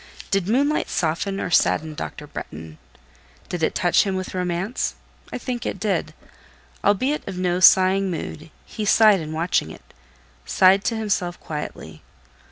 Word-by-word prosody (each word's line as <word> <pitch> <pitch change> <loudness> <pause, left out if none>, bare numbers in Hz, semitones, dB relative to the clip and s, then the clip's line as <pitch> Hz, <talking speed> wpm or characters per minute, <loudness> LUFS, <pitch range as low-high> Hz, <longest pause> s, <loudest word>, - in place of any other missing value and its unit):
Did 195 -3 +1
moonlight 280 +7 +1
soften 180 +4 -1
or 180 - -3
sadden 155 -1 +2
Dr. 150 0 -7
Bretton? 80 - -9 0.7
Did 175 - -4
it 160 - 0
touch 175 -1 +3
him 195 -2 -1
with 185 0 -4
romance? 180 +5 -2 0.4
I - - -3
think 245 -1 -4
it - - -4
did. 205 0 -1 0.7
Albeit 255 +9 +1
of 190 -2 -5
no 180 -1 0
sighing 190 0 +5
mood, 165 -2 -6 0.2
he 215 - -6
sighed 210 -1 +5
in 155 -1 -6
watching 160 - 0
it: - - -14 0.5
sighed 190 +1 +4
to 230 - 0
himself 190 -5 -2
quietly. 150 -1 -7
185 Hz, 150 wpm, -22 LUFS, 170-205 Hz, 0.7 s, sighing